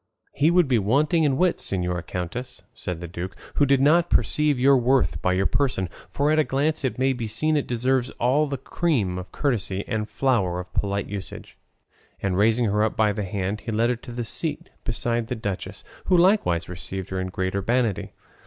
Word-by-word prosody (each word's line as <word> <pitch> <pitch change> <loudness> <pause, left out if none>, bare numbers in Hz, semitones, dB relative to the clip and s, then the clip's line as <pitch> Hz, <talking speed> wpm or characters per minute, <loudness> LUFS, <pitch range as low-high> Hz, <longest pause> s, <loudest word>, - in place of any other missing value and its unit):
"He 150 +3 +3
would 175 -2 +4
be 125 -3 +3
wanting 150 - +2
in 135 -2 +2
wits, 180 +1 +1
señora 90 -2 -1
countess," 90 +9 -5
said 90 -6 -5
the 85 - -5
duke, 90 +3 -6 0.2
"who 145 - +4
did 135 0 +4
not 165 +5 +4
perceive 150 -3 +2
your 135 +2 +6
worth 130 +1 +2
by 90 - +2
your 95 +1 +1
person, 110 -10 0 0.2
for 145 +2 +1
at 155 - +3
a - - +5
glance 150 +3 0
it 130 - -1
may 130 +1 +2
be 120 -3 -4
seen 155 +9 +1
it 145 - 0
deserves 125 +1 +1
all 135 +6 +3
the 140 -1 -3
cream 125 - -1
of 90 - -9
courtesy 105 -8 -1
and 110 -1 -2
flower 100 -10 +1
of 90 0 -9
polite 100 0 -1
usage;" 100 -2 -7 0.6
and 95 -2 -1
raising 110 +4 +3
her 105 0 +1
up 110 - -1
by 105 -1 +3
the 105 -1 -3
hand 100 +2 -3
he 115 - -5
led 115 +3 +2
her - - 0
to 120 +1 -11
a 120 0 -3
seat 150 +6 -4
beside 120 -1 -1
the 125 - -3
duchess, 100 -4 -5 0.2
who 185 - +4
likewise 170 - +3
received 90 +2 -6
her 95 0 -2
with 95 - -5
great 95 0 -2
urbanity. 110 +1 0
115 Hz, 205 wpm, -24 LUFS, 95-140 Hz, 0.6 s, your